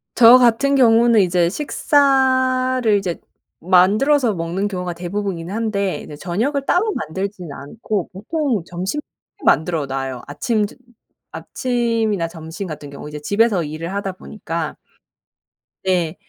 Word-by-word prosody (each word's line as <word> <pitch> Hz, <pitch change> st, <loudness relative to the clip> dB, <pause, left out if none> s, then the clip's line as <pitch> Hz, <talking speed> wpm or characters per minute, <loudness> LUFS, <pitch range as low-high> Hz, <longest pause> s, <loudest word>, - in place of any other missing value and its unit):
저 240 Hz, +1 st, +9 dB
같은 255 Hz, +3 st, +3 dB
경우는 235 Hz, -3 st, +5 dB
이제 175 Hz, -2 st, +2 dB
식사를 260 Hz, -, +2 dB
이제 180 Hz, -4 st, -3 dB, 0.4 s
만들어서 215 Hz, -, +3 dB
먹는 175 Hz, +3 st, -2 dB
경우가 180 Hz, -3 st, -4 dB
대부분이긴 180 Hz, 0 st, -4 dB
한데 205 Hz, -3 st, -1 dB
이제 150 Hz, -, -9 dB
저녁을 225 Hz, -, -2 dB
따로 425 Hz, +9 st, +2 dB
만들지는 185 Hz, -, -5 dB
않고 195 Hz, +6 st, -4 dB
보통 235 Hz, -, -2 dB
점심때 185 Hz, +13 st, -4 dB, 0.4 s
만들어 160 Hz, -2 st, +2 dB
놔요. 135 Hz, -2 st, -4 dB
아침 215 Hz, -, 0 dB
두 205 Hz, -, -10 dB, 0.6 s
아침이나 230 Hz, -7 st, -1 dB
점심 165 Hz, +3 st, -7 dB
같은 150 Hz, -3 st, -8 dB
경우 140 Hz, +1 st, -9 dB
이제 150 Hz, 0 st, -7 dB
집에서 205 Hz, +1 st, +2 dB
일을 160 Hz, +4 st, -5 dB
하다 200 Hz, -1 st, -3 dB
보니까 170 Hz, -5 st, -5 dB, 1.1 s
네. 180 Hz, -3 st, 0 dB
200 Hz, 285 characters per minute, -20 LUFS, 170-240 Hz, 1.1 s, 저